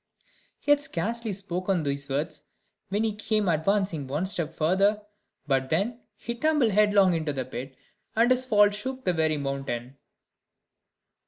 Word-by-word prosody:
He 290 - +1
had 290 - +6
scarcely 230 0 -2
spoken 185 -2 -2
these 140 0 -3
words, 140 +3 -2 0.5
when 205 +3 0
he 220 -1 0
came 215 -1 0
advancing 170 -2 +1
one 150 +7 -1
step 170 -4 -1
further; 195 +6 +2 0.4
but 135 -2 0
then 210 +9 0 0.2
he 235 - -5
tumbled 285 -2 +2
headlong 205 -2 +4
into 155 -3 -1
the 130 -2 -3
pit, 130 +1 -7 0.4
and 230 +3 +4
his 255 0 +4
fall 205 -4 +4
shook 260 +6 -5
the 180 - +2
very 160 -2 +1
mountain. 135 -2 -4
190 Hz, 150 wpm, -27 LUFS, 150-215 Hz, 0.5 s, had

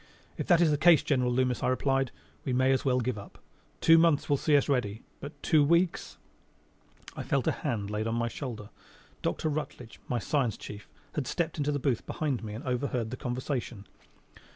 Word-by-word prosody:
"If - - -4
that 175 -3 +5
is 165 -3 +4
the 145 - +1
case, 170 -1 +6
General 125 -4 +1
Loomis," 125 0 +1
I 125 - +1
replied, 135 0 +1 0.3
"we 130 - -2
may 130 +1 +3
as 130 - +1
well 125 -2 +2
give 120 -3 -2
up. 100 - -12 0.4
Two 165 0 +7
months 165 -3 +3
will 145 - +3
see 150 +1 +3
us 140 - +1
ready. 120 -6 -1 0.2
But 145 +2 -9
two 155 -2 +4
weeks 170 +4 +1 0.5
!" - - -20
I - - -4
felt - - 0
a - - +3
hand 105 -3 -3
laid 105 +1 -1
on 115 - -1
my 115 0 0
shoulder. 115 -4 -6 0.5
Dr. - - -1
Rutledge, 145 -6 -5
my 125 - 0
science 120 0 0
chief, 105 0 -9 0.2
had 145 -5 -2
stepped 170 -2 -2
into 145 0 +1
the 145 - 0
booth 135 -4 0
behind 140 -7 -2
me 105 -1 -5
and 115 - -7
overheard 125 -3 -2
the - - -3
conversation. 125 -4 -4
130 Hz, 200 wpm, -29 LUFS, 120-145 Hz, 0.5 s, Two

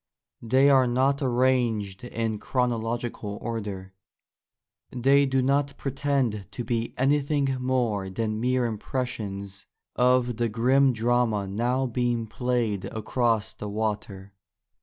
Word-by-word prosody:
They 130 +4 +4
are 130 -2 +5
not 135 +3 +1
arranged 120 -6 +1
in 115 -3 -3
chronological 115 -4 -2
order; 100 -5 -5 1.0
they 135 +3 +3
do 130 -1 +1
not 140 +1 +1
pretend 135 -7 -1
to 120 - -4
be 115 -1 -2
anything 140 0 +1
more 120 -7 0
than 110 +2 -2
mere 125 0 +1
impressions 105 -4 -4 0.3
of 125 -1 +2
the 120 -1 0
grim 130 +5 +3
drama 115 -3 +1
now 120 +7 0
being 120 -1 -1
played 115 -3 -1
across 110 0 -1
the 105 - -7
water. 100 -2 -4
120 Hz, 115 wpm, -26 LUFS, 110-130 Hz, 1.0 s, are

